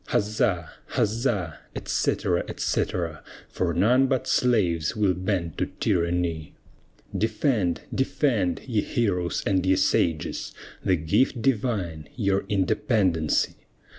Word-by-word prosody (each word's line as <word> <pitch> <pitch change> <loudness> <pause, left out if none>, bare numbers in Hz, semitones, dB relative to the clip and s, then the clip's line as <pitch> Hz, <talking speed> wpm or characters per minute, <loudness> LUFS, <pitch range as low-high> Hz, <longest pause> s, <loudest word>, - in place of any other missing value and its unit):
Huzza! 105 -5 +1 0.3
huzza! 105 - 0 0.2
etc., - - 0
etc. 80 -4 -2 0.3
For 90 -2 -1
none 120 +10 +4
but 130 -2 0
slaves 90 -9 +2
will 105 -3 +2
bend 90 -2 -2
to - - +1
tyranny. 85 -2 0 0.6
Defend, 110 - +1
defend, 120 - +1
ye 115 -5 +1
heroes 90 -8 -1
and 95 -2 +2
ye 95 0 +3
sages, 85 -4 0 0.3
The 95 - +3
gift 90 - +1
divine 100 - -1
your 100 -4 +1
independency! 95 - +1
95 Hz, 105 wpm, -25 LUFS, 85-115 Hz, 0.6 s, none